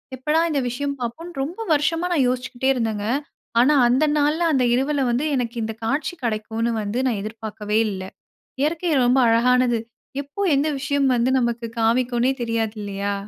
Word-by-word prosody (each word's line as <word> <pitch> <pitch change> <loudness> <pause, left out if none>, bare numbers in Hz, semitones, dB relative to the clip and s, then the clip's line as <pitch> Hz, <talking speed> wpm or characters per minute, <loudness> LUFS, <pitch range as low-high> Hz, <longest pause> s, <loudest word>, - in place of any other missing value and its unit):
எப்படா 300 +5 +1
இந்த 295 -3 0
விஷயம் 280 +3 -3
பார்ப்போன்னு, 285 +9 -5
ரொம்ப 335 +9 -6
வருஷமா 320 +4 +1
நான் 285 -6 +3
யோசிச்சுக்கிட்டே 250 +1 -1
இருந்தேங்க. 220 -4 -2 0.5
ஆனா, 260 +5 +5
அந்த 255 +6 +3
நாள்ல, 300 +3 +1
அந்த 260 -3 +3
இரவுல 275 +3 +1
வந்து, 250 +5 0
எனக்கு 245 -2 -2
இந்த 225 0 -3
காட்சி 285 +8 -1
கிடைக்குன்னு 225 +1 -1
வந்து 210 +4 -2
நான் 230 -5 0
எதிர்பார்க்கவே 215 -1 -3
இல்ல. 190 -2 -5 0.6
இயற்கை 330 +3 0
ரொம்ப 250 +2 +4
அழகானது. 240 +1 +3 0.4
எப்போ, 285 +8 -10 0.2
எந்த 285 +3 +1
விஷயம் 280 0 +1
வந்து, 240 +2 +2
நமக்கு 235 -1 -2
காமிக்குன்னே 240 +2 +2
தெரியாது 225 -2 -1
இல்லயா! 200 0 -3
250 Hz, 155 wpm, -22 LUFS, 225-285 Hz, 0.6 s, ஆனா